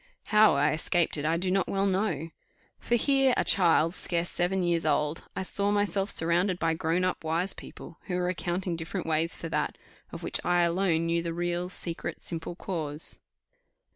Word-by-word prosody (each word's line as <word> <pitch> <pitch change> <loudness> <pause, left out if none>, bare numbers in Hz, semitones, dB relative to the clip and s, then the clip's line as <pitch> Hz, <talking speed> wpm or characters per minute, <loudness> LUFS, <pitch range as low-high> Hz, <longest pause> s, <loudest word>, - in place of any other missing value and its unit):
How 215 -4 +6
I 145 +2 +2
escaped 170 +2 0
it, 145 - -3
I 165 +2 +1
do 185 +2 -1
not 190 -1 +1
well 195 0 0
know. 185 -5 -1 0.5
For 240 - 0
here, 270 +1 +3
a - - +2
child 165 -3 +4
scarce 175 -2 +1
seven 180 +1 0
years 170 -1 +1
old, 150 +1 0
I - - -2
saw 200 +2 +1
myself 205 -1 0
surrounded 175 +3 +1
by 165 -2 0
grown 165 +2 0
up 185 -2 -1
wise 165 +4 0
people, 165 - -12
who 180 - -2
were 180 0 0
accounting 180 0 -2
different 165 +3 -5
ways 165 +1 +2
for 165 - -6
that, - - -2 0.3
of - - -8
which - - +2
I 175 0 +2
alone 170 -1 +1
knew 170 0 +1
the 165 0 -4
real, 175 +1 -2
secret, 170 -2 -4
simple 170 0 -5
cause. 155 -5 -3
175 Hz, 185 wpm, -28 LUFS, 165-190 Hz, 0.5 s, How